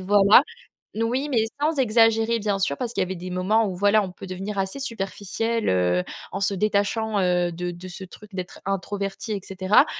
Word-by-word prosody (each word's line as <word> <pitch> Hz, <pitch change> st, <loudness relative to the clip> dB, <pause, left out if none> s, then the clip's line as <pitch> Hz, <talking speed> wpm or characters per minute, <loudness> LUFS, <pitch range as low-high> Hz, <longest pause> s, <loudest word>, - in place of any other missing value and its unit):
voie-là. 200 Hz, +4 st, +6 dB, 0.5 s
N 225 Hz, -, -1 dB
oui, 260 Hz, +5 st, -1 dB
mais 225 Hz, -3 st, +3 dB, 0.2 s
sans 305 Hz, -1 st, +1 dB
exagérer 225 Hz, -1 st, +4 dB
bien 205 Hz, -2 st, -1 dB
sûr 165 Hz, -7 st, +1 dB
parce 235 Hz, -, -3 dB
qu'il -, -, -4 dB
y -, -, +3 dB
avait 190 Hz, +1 st, -4 dB
des 180 Hz, +1 st, -7 dB
moments 190 Hz, +5 st, +2 dB
où, 185 Hz, -3 st, -4 dB
voilà, 205 Hz, +2 st, +4 dB
on 185 Hz, -, -5 dB
peut 190 Hz, -, -10 dB
devenir 195 Hz, +3 st, -5 dB
assez 190 Hz, +5 st, -2 dB
superficiel 225 Hz, -1 st, -2 dB
heu, 90 Hz, -1 st, +2 dB, 0.3 s
en -, -, -3 dB
se 200 Hz, +1 st, +1 dB
détachant, 210 Hz, +2 st, 0 dB
heu, 180 Hz, -1 st, +2 dB
de 175 Hz, +1 st, -3 dB
de 175 Hz, +2 st, -9 dB
ce 185 Hz, +1 st, -7 dB
truc 205 Hz, +2 st, -13 dB
d'être 185 Hz, 0 st, -6 dB
introverti 195 Hz, +2 st, -3 dB
et 205 Hz, -, -1 dB
cetera. 195 Hz, -, +3 dB
200 Hz, 205 wpm, -24 LUFS, 185-220 Hz, 0.5 s, voie-là